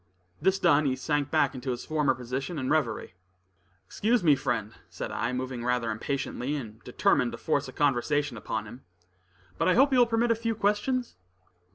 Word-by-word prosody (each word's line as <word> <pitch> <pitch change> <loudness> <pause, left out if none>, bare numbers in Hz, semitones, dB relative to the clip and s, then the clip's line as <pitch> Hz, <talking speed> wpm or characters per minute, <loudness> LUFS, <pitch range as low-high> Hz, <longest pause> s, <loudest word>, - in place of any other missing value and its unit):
This 190 +3 +3
done, 150 -4 +4
he 130 - +1
sank 145 +2 -1
back - - +2
to 130 - -4
his 125 -1 -3
former 150 -4 +1
position 130 +6 -4
and 130 -2 -2
reverie. 140 -12 0 0.7
"Excuse 220 - +1
me, 155 -3 +6
friend," 115 -6 -2 0.2
said - - -6
I, 115 - -1
moving 125 -1 -4
rather 125 -2 0
impatiently, 135 +4 -3
and 110 -6 -7
determined - - +1
to - - -5
force - - 0
a - - -8
conversation 145 0 +1
upon 110 0 -4
him, 120 +5 -11 0.8
"but - - +2
I 185 - +4
hope 270 +3 +5
you 255 - +5
will 240 - +6
permit 230 +1 +2
a - - +4
few 230 0 -2
questions?" 220 +5 0
140 Hz, 185 wpm, -28 LUFS, 125-190 Hz, 0.8 s, me